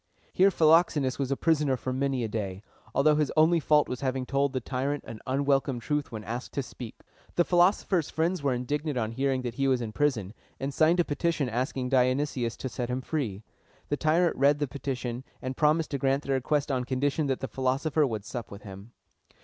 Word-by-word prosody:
Here 190 +2 +5
Philoxenus 155 -6 +3
was 135 -2 -1
a 140 - 0
prisoner 150 -5 +2
for 130 +1 -3
many 135 -1 0
a - - -1
day, 100 -3 -4 0.3
although 150 +2 +5
his 150 -2 +1
only 165 +2 +5
fault 150 -1 +3
was 125 - -5
having 130 -1 -1
told 140 +1 +1
the 130 - -1
tyrant 135 +4 -2
an 110 - -8
unwelcome 135 -1 +1
truth 150 +4 -2
when 110 -2 -6
asked 120 +4 -5
to 140 - -1
speak. 120 -2 -10 0.3
The 175 - +3
philosopher's 175 -2 +2
friends 165 +2 0
were 140 -1 +1
indignant 145 +3 -2
on 110 -2 -1
hearing 130 +1 0
that 120 -2 -3
he 135 +2 0
was 130 -2 +3
in 115 -3 -4
prison, 110 -7 0 0.3
and 135 +1 -3
signed 165 +4 +3
a 175 - +4
petition 150 -2 0
asking 125 +2 -2
Dionysius 130 -2 +1
to - - -4
set 120 -1 -4
him 125 +1 -2
free. 120 -9 -3 0.5
The 145 - +1
tyrant 165 +3 +2
read 140 +2 +4
the 145 -1 -1
petition, 130 -2 -4 0.2
and 130 0 -4
promised 155 +2 +2
to 140 - -2
grant 135 +2 +1
their 140 - -1
request 140 +2 0
on 130 -2 0
condition 140 +4 0
that 135 -1 -1
the 135 - -2
philosopher 135 +4 +1
would 110 -4 -4
sup 120 0 -6
with 100 0 -10
him. 100 +3 -11
135 Hz, 205 wpm, -28 LUFS, 125-150 Hz, 0.5 s, Here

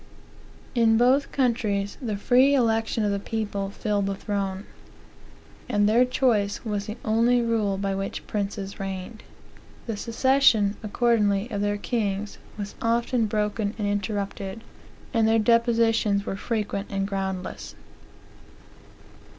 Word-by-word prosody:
In 225 -2 +4
both 260 +4 +3
countries, 220 -6 0
the 220 -5 -2
free 255 +6 +4
election 225 -3 +1
of 205 - +1
the 200 - -1
people 205 -2 -3
filled 205 0 -1
the 195 - -1
throne; 195 -1 -3 1.0
and 205 0 +3
their 235 +4 +5
choice 235 -5 +1
was 205 -2 -2
the 215 +2 -5
only 230 +3 +3
rule 225 -4 0
by 195 0 -1
which 195 0 -4
princes 200 -1 -4
reigned. 195 +3 -5 0.6
The 225 - -3
succession, 230 -2 +3
accordingly, 215 -1 +1
of 205 -2 -2
their 205 0 0
kings 205 -2 -2 0.2
was 205 -1 -5
often 235 0 +1
broken 210 0 -1
and 210 -2 -1
interrupted, 205 +1 -3 0.5
and 225 -2 +3
their 225 0 +4
depositions 225 -3 +2
were - - -3
frequent 205 -2 -3
and 195 0 -1
groundless. 190 -2 -4
210 Hz, 125 wpm, -25 LUFS, 200-230 Hz, 1.0 s, their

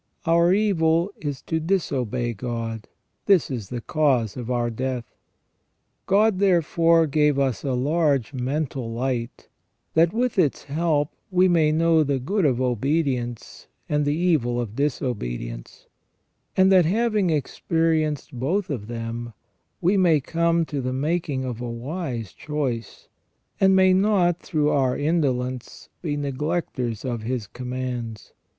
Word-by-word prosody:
Our 170 +1 +4
evil 180 -3 +2
is 145 -3 -5
to 160 - -1
disobey 135 - -1
God; 115 -1 -5 0.4
this 190 -8 +4
is 115 -7 -5
the 120 -1 -4
cause 130 - +1
of 125 -2 -6
our 120 -1 0
death. 125 +1 -3 1.0
God 205 0 +3
therefore 170 -3 +3
gave 150 -1 +2
us 135 -6 0
a 135 - -1
large 140 -1 +1
mental 130 -2 -2
light, 120 0 -3 0.5
that 165 +1 +4
with 240 -1 0
its 150 -7 +1
help 150 0 0 0.2
we 185 -1 +4
may 165 -4 +3
know 165 0 +3
the 140 -2 0
good 185 +9 0
of 130 -4 +2
obedience 125 -1 -1 0.2
and 150 0 +1
the 145 +1 +1
evil 155 -9 +1
of 115 -3 -4
disobedience, - - -3 0.7
and 190 0 +5
that 185 -3 +6
having 215 +1 +1
expe 155 -4 -2
rienced 160 -3 +1
both 170 +10 -1
of 110 -7 -4
them, 115 0 -5 0.5
we 190 +4 +3
may 170 -5 +4
come 170 +3 +1
to 145 -3 -3
the 130 0 -2
making 145 -1 -1
of 120 -2 -5
a 120 - -4
wise 120 - -5
choice, 130 - -4 0.5
and 190 0 +5
may 185 0 +5
not 185 -3 +3
through 150 -2 0
our 130 -3 +1
indolence 130 -5 -1
be 150 -4 -2
neglectors 140 - -2
of 120 -3 -2
His 120 0 -3
commands. 125 -2 -5
145 Hz, 140 wpm, -24 LUFS, 125-165 Hz, 1.0 s, that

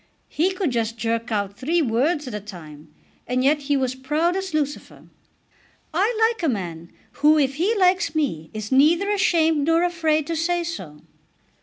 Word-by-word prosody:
He 350 +5 +1
could 370 -6 -1
just 230 -1 -2
jerk 230 +1 -2
out 200 -2 -2
three 320 +7 +1
words 280 +5 0
at 250 - -6
a 210 - -3
time, 160 -7 -12 0.4
and 255 +1 0
yet 295 +3 +3
he 285 0 0
was 260 -1 -1
proud 300 +7 0
as 385 0 -3
Lucifer. 295 -2 -3 0.9
I 415 +7 +1 0.2
like 450 - -12
a 325 - +1
man 170 -7 -5 0.3
who 305 +1 +6
if 275 -2 +2
he 395 +8 +1
likes 365 -5 +2
me 165 - -2
is 215 +1 -6
neither 330 +9 +4
ashamed 325 -6 +2
nor 330 +1 +3
afraid 320 -4 +1
to 335 - -3
say 345 +2 0
so." 185 - -7
295 Hz, 175 wpm, -23 LUFS, 230-335 Hz, 0.9 s, who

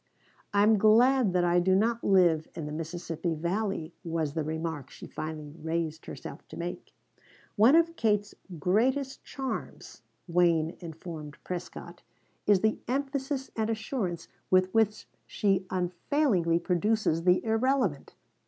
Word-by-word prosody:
"I 200 0 +4
am 215 0 +5
glad 235 +2 +5
that 180 -1 +2
I 175 0 +3
do 185 +2 +3
not 230 +4 +1
live 175 -5 +4
in 160 -3 -5
the 150 - -5
Mississippi 165 +1 -3
Valley," 175 0 -2
was 160 -4 -2
the 160 -1 -1
remark 160 -2 -4
she - - -11
finally 155 -1 -6
raised 160 0 -3
herself - - -9
to - - -10
make. 175 +1 -6 0.6
"One 230 +8 +6
of 335 0 +3
Kate's 210 -5 +1 0.2
greatest 255 - +1
charms," 265 -2 -6 0.3
Wayne 170 -2 +2
informed 160 -3 -8
Prescott, 180 -1 -7 0.5
"is 200 -3 +5
the 220 0 +1
emphasis 270 +1 -2
and 220 -1 -1
assurance 220 - -3 0.2
with 185 0 +3
which 220 -1 +1 0.2
she 195 -2 0
unfailingly 180 - +1
produces 180 0 +1
the 180 +3 +3
irrelevant. 225 - 0
185 Hz, 135 wpm, -29 LUFS, 165-225 Hz, 0.6 s, One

